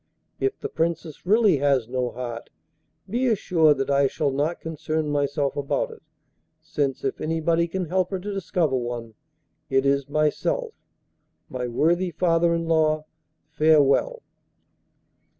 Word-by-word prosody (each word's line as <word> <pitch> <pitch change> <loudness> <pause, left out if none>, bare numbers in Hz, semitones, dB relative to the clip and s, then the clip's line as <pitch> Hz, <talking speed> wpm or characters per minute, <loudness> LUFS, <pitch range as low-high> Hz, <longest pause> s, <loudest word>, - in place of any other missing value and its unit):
If 400 +1 -1
the - - -4
Princess 165 0 -3
really 210 -5 +4
has 135 -4 +2
no 125 0 -1
heart, 120 -2 -6 0.6
be 245 +6 0
assured 165 - +3
that 135 +1 -1
I 140 0 +4
shall 140 +1 -1
not 150 +5 -1
concern 155 -1 -3
myself 145 -1 0
about 145 - -1
it, 455 - -13 0.6
since, 140 -3 -2
if 135 - -2
anybody 165 +1 +1
can 185 +2 -3
help 180 +2 0
her 190 - -2
to 200 +3 -5
discover 175 -6 0
one, 120 -2 -4 0.6
it 135 0 +2
is 140 0 +1
myself. 155 - 0 0.8
My 125 -1 -3
worthy 170 +9 +1
father 170 -1 +2
in 165 0 -2
law, 155 -1 +2 0.5
farewell! 155 - +3
155 Hz, 135 wpm, -24 LUFS, 140-175 Hz, 0.8 s, really